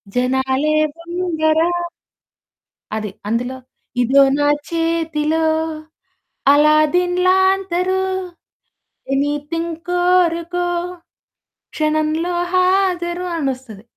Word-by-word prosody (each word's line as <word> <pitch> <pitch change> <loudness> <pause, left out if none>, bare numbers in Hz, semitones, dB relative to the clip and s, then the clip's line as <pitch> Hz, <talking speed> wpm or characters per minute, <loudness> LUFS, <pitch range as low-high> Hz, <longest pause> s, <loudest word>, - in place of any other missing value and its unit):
జనాలే 265 +4 +1 0.2
దొంగరా. 335 -2 0 1.3
అది 215 -1 -3 0.2
అందులో, 245 +4 -2 0.4
ఇదో 265 +3 +5 0.2
నా 290 0 +2 0.2
చేతిలో 325 -1 0 1.1
అల్లాదీన్ 310 +4 +3
లాంతరు 380 -1 +2 1.1
ఎనిథింగ్ 295 +4 -2
కోరుకో 355 -1 +1 1.1
క్షణంలో 310 +2 0 0.2
హాజరు 365 -1 +1
అనొస్తది 260 -8 -4
325 Hz, 60 wpm, -19 LUFS, 290-355 Hz, 1.3 s, ఇదో